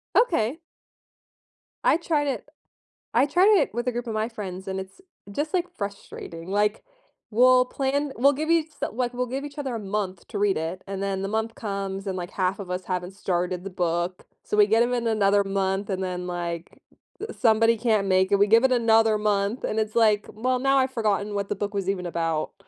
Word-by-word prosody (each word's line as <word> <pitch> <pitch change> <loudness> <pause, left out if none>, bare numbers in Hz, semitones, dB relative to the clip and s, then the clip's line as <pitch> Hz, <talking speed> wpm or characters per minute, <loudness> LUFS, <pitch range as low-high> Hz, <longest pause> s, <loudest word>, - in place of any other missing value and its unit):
Okay. 320 - +2 1.3
I - - +5
tried 315 -3 0
it 265 -2 -3 0.7
I 245 +4 +5
tried 370 +8 +5
it - - 0
with 240 +2 -3
a - - +2
group 240 0 -4
of 225 - -3
my 215 +1 0
friends, 195 -5 -7
and 190 0 -2
it's 190 - -9 0.3
just, 295 - -3
like, 360 -1 +1
frustrating. 195 -4 -7
Like, 210 +1 +1 0.5
we'll 250 +3 +5
plan 275 +2 -1
we'll 280 +4 +5
give 310 +4 -3
each 325 -2 +2 0.2
like, 245 +2 -2
we'll 250 0 -2
give 270 +3 -4
each 290 0 -10
other 265 -4 -3
a - - -3
month 195 -2 -4
to 210 - -4
read 205 -1 +2
it, 165 +4 -4
and 195 0 -4
then 195 -1 -1
the 195 - -2
month 220 +2 -2
comes 195 -1 -4
and, 190 -1 -2
like, 175 +1 -5
half 185 0 0
of 190 -3 -6
us 180 0 -3
haven't 180 0 -3
started 180 -2 -2
the 195 - -5
book, 175 0 -2 0.2
so 210 - -2
we 210 - +7
get 220 +2 +4
'em 245 +1 -1
in 240 -1 -2
another 205 -2 +3
month 195 0 -1
and 190 0 -2
then, 180 -1 -3
like, 175 -1 -5 0.4
uh, 435 +1 -5
somebody 225 -1 +3
can't 215 -3 +1
make 190 0 +3
it, 200 - +5
we 205 - +5
give 225 +3 +5
it 265 - +4
another 225 -2 +4
month 205 +2 0
and 215 - -1
it's 215 0 -2
like, 215 -3 +3
"Well, 255 +4 0
now 270 +1 +3
I've 260 -1 +2
forgotten 210 -3 -1
what 200 -1 -2
the 205 - -1
book 205 +1 -3
was 195 -2 -2
even 185 -2 -2
about." 165 -2 -2
210 Hz, 215 wpm, -25 LUFS, 190-245 Hz, 1.3 s, we